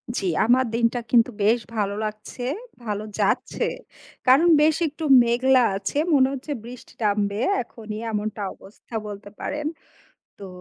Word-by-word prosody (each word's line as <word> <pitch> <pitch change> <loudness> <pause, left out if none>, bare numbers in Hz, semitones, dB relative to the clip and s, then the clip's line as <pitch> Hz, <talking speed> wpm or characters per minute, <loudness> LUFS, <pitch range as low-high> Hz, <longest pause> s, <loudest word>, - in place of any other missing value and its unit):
জি। - - -2 0.2
আমার 255 +3 +4
দিনটা 235 +1 +1
কিন্তু 235 -1 +5
বেশ 225 +4 +4 0.2
ভালো 200 -2 0
লাগছে, 215 +3 -7 0.4
ভালো 210 0 -3 0.2
যাচ্ছে। - - 0 0.6
কারণ 275 +7 +6
বেশ 310 0 +4
একটু 305 +2 -7 0.2
মেঘলা 255 +2 +3
আছে, 195 +7 -3 0.2
মনে 265 -2 +5
হচ্ছে 280 +3 -6
বৃষ্টি 245 +1 -11
টা - - +1
নামবে 200 0 -1 0.2
এখনই 215 -2 -8
এমনটা 210 0 -3
অবস্থা 210 +3 -14
বলতে 205 0 -8
পারেন। 300 0 -3 0.7
তো 195 - -8
230 Hz, 140 wpm, -24 LUFS, 210-260 Hz, 0.7 s, কারণ